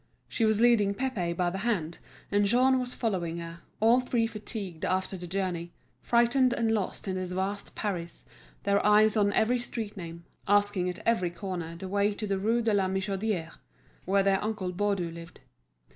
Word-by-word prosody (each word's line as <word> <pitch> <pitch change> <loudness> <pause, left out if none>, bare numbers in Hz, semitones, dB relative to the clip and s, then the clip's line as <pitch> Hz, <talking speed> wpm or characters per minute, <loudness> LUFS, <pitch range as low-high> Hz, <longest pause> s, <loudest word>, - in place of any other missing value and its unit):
She 225 - 0
was 220 -1 +2
leading 225 -4 +4
Pépé 195 -10 -2
by 175 -1 +1
the 190 - -4
hand, 190 -8 -1 0.3
and 205 0 +3
Jean 255 +5 +4
was 250 0 -4
following 180 -8 -1
her, 170 0 -7 0.2
all 230 +3 +5
three 245 -2 0
fatigued 210 -6 -6
after 185 +1 0
the 175 -1 -7
journey, 175 -2 -3 0.3
frightened 240 +2 +3
and 225 -1 +1
lost 205 -3 -2
in 190 - -1
this 185 -1 -4
vast 195 +2 -3
Paris, 175 -5 -4 0.4
their 200 0 +2
eyes 210 +1 +5
on 205 -2 +3
every 245 +3 +2
street 225 -3 -5
name, 170 -2 -8 0.2
asking 205 -2 +3
at 180 - -7
every 205 -7 +2
corner 175 -2 -5
the 190 +3 -7
way 200 +2 +1
to 215 - -4
the 195 -2 -1
Rue 230 +4 +1
de 225 -1 +2
la 195 -2 +3
Michodière, 190 -2 -2 0.5
where 195 +1 +3
their 195 0 +2
uncle 210 -4 -2
Baudu 195 -3 0
lived. 165 0 -11
200 Hz, 180 wpm, -29 LUFS, 180-220 Hz, 0.5 s, all